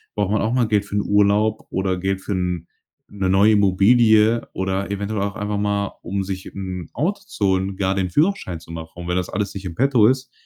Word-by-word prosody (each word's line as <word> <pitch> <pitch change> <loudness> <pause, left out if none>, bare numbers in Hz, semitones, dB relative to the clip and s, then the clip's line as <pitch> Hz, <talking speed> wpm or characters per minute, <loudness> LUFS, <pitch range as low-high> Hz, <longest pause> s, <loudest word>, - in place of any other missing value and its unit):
braucht 100 -2 0
man 110 - +1
auch 110 - 0
mal 125 -2 +2
Geld 105 -1 +2
für 100 - -6
'n 105 - +2
Urlaub 105 +2 +2
oder 95 0 -1
Geld 95 +1 -2
für 105 - -6
'n 90 -2 -2 0.4
'ne 95 -2 -2
neue 100 +3 +5
Immobilie 110 +3 +4
oder 95 +1 -2
eventuell 100 +1 -2
auch 100 +1 -2
einfach 105 0 -3
mal, 100 -1 -1
um 100 +2 -3
sich 95 -1 -5
'n 95 -3 -6
Auto 195 +7 -1
zu 105 - -2
holen, 95 0 0
gar 95 0 0
den 95 -1 -1
Führerschein 150 - 0
zu 80 0 -14
machen. 80 -1 -7
Und 85 0 -8
wenn 90 - -1
das 90 - -2
alles 100 0 -3
nicht 100 -1 -7
in 85 -3 -5
petto 125 -3 +4
ist, 130 +2 0
100 Hz, 225 wpm, -21 LUFS, 95-105 Hz, 0.4 s, neue